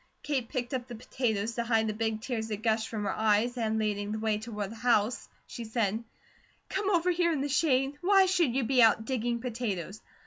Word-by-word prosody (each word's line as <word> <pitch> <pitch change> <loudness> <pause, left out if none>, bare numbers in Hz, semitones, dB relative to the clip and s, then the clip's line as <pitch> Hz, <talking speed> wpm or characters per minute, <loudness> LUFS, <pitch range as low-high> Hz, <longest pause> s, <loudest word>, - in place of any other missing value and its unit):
Kate 265 -6 -2
picked 250 -2 -3
up 250 -1 -3
the 240 - -7
potatoes, 225 -2 -2
to 235 - -2
hide 225 -1 +2
the 215 - -1
big 220 0 -2
tears 225 -2 -3
that 215 -1 -5
gushed 220 -1 +1
from 215 -2 -3
her 195 - -1
eyes, 220 +3 +2
and 220 -2 -1
leading 205 -1 -1
the 215 - -2
way 215 -1 0
toward 210 -3 -5
the - - -8
house 230 0 +1 0.2
she 235 - -7
said: 220 -1 -1 0.7
"Come 390 +1 -1
over 360 -2 +2
here 340 -1 +2
in 300 -4 -1
the 285 - -1
shade. 280 -2 +1
Why 390 +1 +5
should 345 -9 +2
you 270 - +1
be 255 +1 +3
out 220 -1 +5
digging 240 -1 -1
potatoes?" 215 -5 -4
230 Hz, 215 wpm, -29 LUFS, 220-260 Hz, 0.7 s, Why